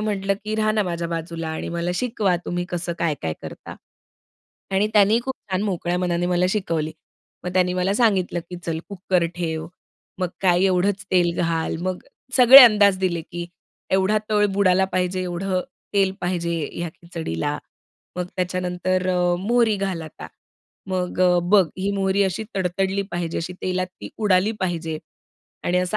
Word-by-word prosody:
म्हटलं, 200 -2 0
की 215 0 -2
"राहा 215 0 +1
ना 215 -1 +2
माझ्या 170 -2 -3
बाजूला 165 0 -4
आणि 160 - -4
मला 170 +1 -1
शिकवा, 210 -5 0
तुम्ही 175 0 -2
कसं 175 -1 -3
काय-काय 145 - -1
करता." - - -9 1.0
आणि 205 +2 +2
त्यांनी 210 +2 +5
खूप 265 - -3 0.2
छान 185 +1 0
मोकळ्या 180 -3 -1
मनाने 175 -1 0
मला 180 0 +2
शिकवली. 165 -6 -1 0.5
मग 180 - -3
त्यांनी 180 -1 +2
मला 185 +2 +1
सांगितलं, 195 -6 +2
की 180 - -5
"चल 165 -1 -1
कुकर 185 -3 0
ठेव," 160 -2 -3 0.5
मग 180 - +1
काय, 180 -1 +3
"एवढंच 190 +1 +1
तेल 175 -2 +3
घाल." 165 -1 -1
मग 185 0 -3 0.3
सगळे 255 +1 +11
अंदाज 205 -4 +5
दिले, 180 -3 0
की 175 +1 -7 0.5
एवढा 190 +3 +3
तळ 210 -1 +4
बुडाला 190 -1 +4
पाहिजे, 185 0 0
एवढं 185 +1 -2 0.3
तेल 195 -1 +3
पाहिजे, 170 -1 -1 0.2
ह्या 170 0 -3
खिचडीला. 150 - -4 0.6
मग 180 -1 -2
त्याच्यानंतर 180 0 -1
अ, 180 -1 +2
"मोहरी 225 +2 +2
घाल 195 -4 -2
आता." 155 - -9 0.6
मग 185 -1 -2
अ, 180 -1 +5
"बघ, 195 +2 +5
ही 195 +2 0
मोहरी 195 0 +1
अशी 190 +3 -2
तडतडली 190 +1 0
पाहिजे, 175 -1 -2
अशी 165 +2 -4
तेलात 185 0 -1
ती - - -7 0.2
उडाली 195 +2 +3
पाहिजे 165 -4 -2 0.7
आणि 180 +1 +2
असा 180 +3 0
180 Hz, 160 wpm, -23 LUFS, 175-195 Hz, 1.0 s, सगळे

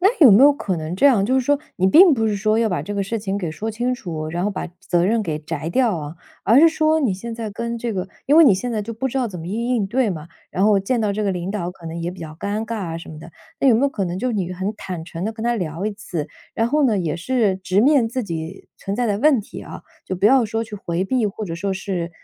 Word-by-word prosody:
那 380 - +5
有 270 -10 +8
没 215 +7 +7
有 290 - +8
可 195 -10 -3
能 160 +2 -4
这 280 - +5
样， 220 -8 +4
就 255 - +1
是 265 - +4
说 285 +3 +2 0.2
你 185 - +2
并 335 - +7
不 225 -4 +1
是 215 - 0
说 215 +2 +1
要 230 -1 +2
把 175 -6 -2
这 205 - -5
个 200 -1 -1
事 225 +3 -3
情 200 -1 -2
给 170 -5 -3
说 220 +7 -4
清 240 +3 -1
楚， 170 -11 -5
然 175 +3 -3
后 205 - +1
把 195 - -4
责 175 0 +1
任 225 +1 +2
给 160 -6 -3
摘 155 +1 -5
掉 235 -1 +2
啊， 150 +1 -7 0.3
而 230 +5 +5
是 330 +3 +8
说 315 0 +2
你 250 -11 +1
现 230 +5 -7
在 225 -1 -5
跟 235 +3 -4
这 230 -1 -3
个 185 -1 -3 0.2
因 285 - +4
为 330 - +9
你 265 - +7
现 240 +6 -2
在 215 -2 -1
就 230 +3 -6
不 250 +4 -3
知 265 - -4
道 255 -3 +1
怎 180 -4 -8
么 165 - -7
应 235 +6 -1
应 205 -4 0
对 240 +1 +1
嘛， 160 -3 -6 0.2
然 190 - 0
后 205 -2 +4
见 235 +5 0
到 210 -2 0
这 215 - -2
个 200 - +1
领 180 +1 -3
导， 180 -4 -3
可 175 -2 -13
能 165 +1 -5
也 170 - -2
比 180 - -11
较 155 -2 -8
尴 205 +6 -3
尬 230 - -4
啊 170 -6 -4
什 - - -11
么 155 - -9
的。 165 +1 -11 0.3
那 275 - +4
有 230 - +6
没 240 - +1
有 280 - +4
可 210 -8 -3
能 180 +1 -3
就 250 +3 -1
你 185 -4 -2
很 190 +4 -3
坦 180 -5 -6
诚 170 +1 -6
地 220 - -2
跟 220 0 -7
他 240 0 +2
聊 180 -1 -3
一 215 - -2
次， 180 -7 -5 0.3
然 225 - 0
后 295 +4 +2
呢， 220 -6 +2
也 160 -4 -1
是 215 +2 +1
直 190 +1 +1
面 270 -2 +4
自 245 0 -3
己 165 0 -6
存 195 +1 -4
在 245 0 0
的 205 -1 0
问 285 -2 +4
题 205 - -10
啊， - - -9 0.2
就 185 - -4
不 195 - +3
要 260 +1 +5
说 225 +1 -2
去 215 -1 -9
回 175 -2 -2
避， 240 +2 +1
或 215 +2 -6
者 165 -4 -5
说 195 +4 -2
是 185 -3 -3
205 Hz, 325 characters per minute, -21 LUFS, 180-235 Hz, 0.3 s, 为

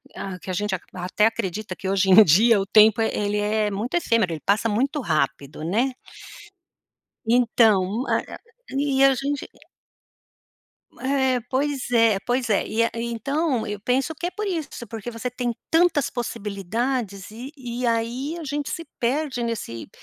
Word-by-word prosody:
ah, 190 -2 -5
que 185 - -10
a - - -3
gente 205 +1 -1
ac 180 - -9
até 185 +3 0
acredita 200 -2 -3
que 190 - -5
hoje 195 0 +2
em 215 +3 +10
dia 205 +6 +5
o - - -2
tempo 215 +1 +6
ele 210 -1 0
é 210 0 0
muito 220 - -3
efêmero, 230 - +1
ele 155 - -6
passa 210 +3 +2
muito 270 +7 0
rápido, 150 - -2
né. 235 +10 0 1.3
Então, 225 -2 +3
a - - +2
a - - -7 0.4
e 275 -1 +2
a 270 - +6
gente 275 +2 -3 1.5
É, 265 -2 +1
pois 275 -1 -1
é, 230 -4 +4
pois 245 -1 0
é, 205 - +2
e 230 +1 +2
a, - - 0
e 230 +1 -3
então 275 +2 -1
eu 210 -1 -5
penso 260 +7 0
que 345 - -4
é - - -2
por 425 +1 -4
isso, 330 -6 -2 0.2
porque 225 +1 -6
você 230 +2 -4
tem 245 -1 -2 0.2
tantas 325 -4 +3
possibilidades 210 -1 -3
e 245 +5 -8
e 245 -1 -5
aí 235 +7 -1
a 325 - -7
gente 290 0 -3
se 330 - -4 0.2
perde 260 +1 0
nesse 225 - -4
230 Hz, 170 wpm, -23 LUFS, 205-265 Hz, 1.5 s, em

